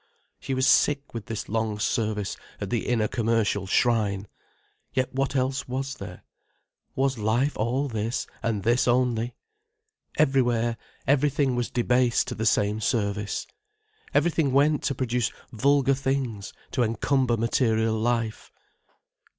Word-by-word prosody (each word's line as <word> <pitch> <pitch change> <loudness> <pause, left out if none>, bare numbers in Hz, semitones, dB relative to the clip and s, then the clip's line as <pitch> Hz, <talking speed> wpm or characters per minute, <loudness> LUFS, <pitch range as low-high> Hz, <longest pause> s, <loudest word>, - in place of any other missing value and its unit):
She 135 - -3
was 130 0 +2
sick 145 +1 +3
with 115 -3 -6
this 115 -3 -4
long 110 -1 -1
service 105 -2 -1 0.2
at 100 - -5
the 120 - -1
inner 115 -3 +2
commercial 110 -4 0
shrine. 105 -2 +1 0.7
Yet 130 -1 0
what 135 +1 -1
else 130 +1 0
was 135 +2 -3
there? - - -9 0.7
Was 135 -2 0
life 120 +7 +1
all 125 +6 0
this, 110 -1 -2 0.2
and 110 -4 -1
this 120 +4 +2
only? 120 -1 +1 0.8
Everywhere, 120 -5 +2 0.3
everything 140 -1 +2
was 120 -1 -1
debased 125 0 +2
to - - -3
the 110 -1 -1
same 105 +1 +2
service. 105 -1 -1 0.7
Everything 160 - +2
went 145 +2 +3
to 140 - 0
produce 125 -2 0 0.2
vulgar 140 +3 +3
things, 130 -6 -2 0.2
to 125 - 0
encumber 120 +2 +1
material 115 -1 +1
life. 115 0 -1
120 Hz, 130 wpm, -26 LUFS, 110-135 Hz, 0.8 s, sick